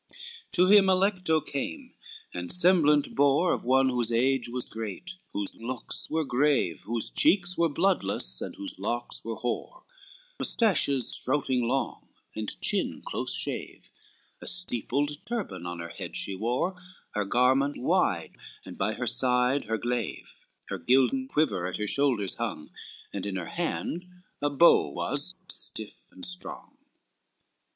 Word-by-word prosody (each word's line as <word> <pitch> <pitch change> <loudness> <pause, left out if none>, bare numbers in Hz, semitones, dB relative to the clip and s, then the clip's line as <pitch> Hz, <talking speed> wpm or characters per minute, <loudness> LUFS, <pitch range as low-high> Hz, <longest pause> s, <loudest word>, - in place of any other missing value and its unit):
VIII - - -12 0.4
To 180 -1 +5
him 200 0 +7
Alecto 185 -4 +2
came, 140 - -5 0.4
and 90 0 -5
semblant 165 -5 +4
bore 145 +5 +3
Of - - -3
one 130 +2 +4
whose 120 -2 0
age 125 +1 +2
was 125 +1 -2
great, 110 - -6 0.2
whose 100 -1 -3
looks 120 +2 -3
were 160 0 0
grave, 135 - +1
Whose 115 0 -1
cheeks 185 - +3
were 170 0 +2
bloodless, 140 - +1
and - - -5
whose 100 -1 -5
locks 120 +4 -2
were 115 0 -4
hoar 230 - -4 0.6
Mustaches 150 - +2
strouting 130 -3 +1
long 135 +3 -2 0.3
and 110 -1 -4
chin - - -1
close - - -2
shave, - - -4 0.5
A - - -6
steepled 145 -2 +1
turban 215 - -4
on 85 0 -5
her 85 0 -6
head - - -7
she 100 - -1
wore, 120 - -1 0.4
Her 105 - -1
garment 130 +6 +2
wide, 125 - 0 0.3
and - - -10
by - - +1
her - - -4
side, 125 +2 +2
her 110 +1 -1
glaive, 120 0 -3 0.4
Her - - -3
gilden 135 - +2
quiver 150 - 0
at 90 - -4
her 105 - -2
shoulders 120 -5 +1
hung, 110 -10 -4 0.4
And 100 - -4
in 100 - -3
her 90 -3 -4
hand 175 +1 -3 0.3
a 145 - +2
bow 145 +4 +5
was, 145 +7 -2
stiff 110 -1 -3
and 90 -1 -6
strong. 90 +1 -5
130 Hz, 145 wpm, -28 LUFS, 110-160 Hz, 0.6 s, him